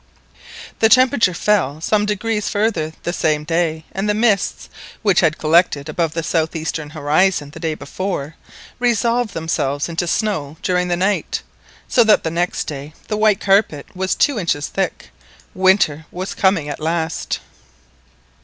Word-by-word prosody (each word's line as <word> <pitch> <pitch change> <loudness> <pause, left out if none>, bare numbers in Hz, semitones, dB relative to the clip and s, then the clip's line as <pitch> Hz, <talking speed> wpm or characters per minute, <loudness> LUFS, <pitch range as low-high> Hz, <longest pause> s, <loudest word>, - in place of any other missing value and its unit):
The 220 - +5
temperature 240 -6 +4
fell 170 -10 +1
some 210 +5 +1
degrees 210 0 -1
farther 205 -7 0
the 175 - -2
same 155 -3 0
day, 160 0 -1
and 195 +2 -2
the 210 - +2
mists, 215 -3 +1 0.4
which 200 -5 +4
had 160 -3 +2
collected 155 -2 +2
above 160 0 -1
the 165 - -1
south 160 0 0
eastern 160 -1 -3
horizon 155 +1 +1
the 165 - -10
day 160 -2 -2
before, 155 0 -4 0.5
resolved 240 -1 +1
themselves 145 -3 -1
into 170 +1 -2
snow 160 -7 -1
during 180 -1 +1
the 175 -1 0
night, 195 +3 -1 0.4
so 240 - +4
that 220 -1 +4
the 160 - -2
next 175 +2 -1
day 145 +1 -7
the 215 - 0
white 215 -2 +3
carpet 195 -8 +1
was 190 0 -1
two 280 -7 +2
inches 150 -5 -1
thick. - - -3 0.4
Winter 185 -5 +2
was 185 +2 -5
coming 190 -6 +1
at 145 - -5
last. 160 +1 -2
175 Hz, 155 wpm, -19 LUFS, 155-205 Hz, 0.5 s, The